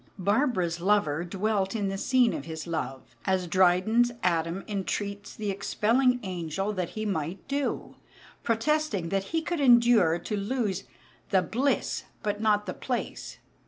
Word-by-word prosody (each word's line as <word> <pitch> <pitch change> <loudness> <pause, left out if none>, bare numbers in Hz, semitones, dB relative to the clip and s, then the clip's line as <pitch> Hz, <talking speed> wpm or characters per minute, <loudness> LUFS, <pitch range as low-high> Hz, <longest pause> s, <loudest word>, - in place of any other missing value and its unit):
Barbara's 195 - +1
lover 175 -5 +2
dwelt 195 +2 -1
in 205 -3 0
the 195 - -3
scene 250 +1 +3
of 140 - -5
his 160 -1 -6
love, 155 -6 -5
as 190 -2 +1
Dryden's 185 +7 +3
Adam 170 +1 0
entreats 200 0 -3
the 210 -2 -2
expelling 240 +6 +2
angel 185 +2 -3
that 185 -4 -2
he 215 - -2
might 180 -2 -3
do, 280 0 -2 0.5
protesting 230 - 0
that 195 +1 0
he 325 +6 -1
could 345 -1 -2
endure 235 - +5
to 210 - -4
lose 205 -2 -2 0.4
"the 190 -2 +3
bliss, 265 +9 0 0.2
but 210 -1 -2
not 210 -1 +2
the - - -4
place." - - -4
200 Hz, 145 wpm, -28 LUFS, 180-230 Hz, 0.5 s, endure